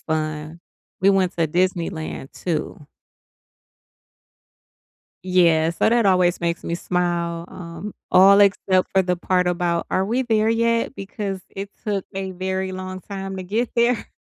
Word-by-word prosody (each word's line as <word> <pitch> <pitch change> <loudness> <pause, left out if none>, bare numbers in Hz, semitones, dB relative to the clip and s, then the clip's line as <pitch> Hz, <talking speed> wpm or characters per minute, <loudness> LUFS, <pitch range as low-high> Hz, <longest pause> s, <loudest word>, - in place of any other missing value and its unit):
fun, 155 +1 -3 0.4
we 195 - +6
went 190 -3 +1
to 165 -1 +2
Disneyland 170 -4 -2
too 155 -3 -4 2.4
Yes, 170 -3 +3
so - - +3
that 235 0 +3
always 180 -3 +3
makes 170 0 -2
me 170 - -2
smile, 170 -1 -1
um, 180 +4 -8 0.2
all 200 +2 +7
except 190 -2 +3
for 190 - +4
the 180 0 0
part 180 +1 +1
about 175 -1 0
"are 190 - +1
we 235 +6 0
there 220 -3 +2
yet" 230 +2 +1
because 195 -1 -5
it 195 +1 -7
took 200 -3 -1
a 190 0 -4
very 190 +1 -3
long 185 0 -6
time 195 0 -6
to 185 - -5
get 220 +6 -1
there. 235 -1 +2
185 Hz, 145 wpm, -22 LUFS, 170-200 Hz, 2.4 s, all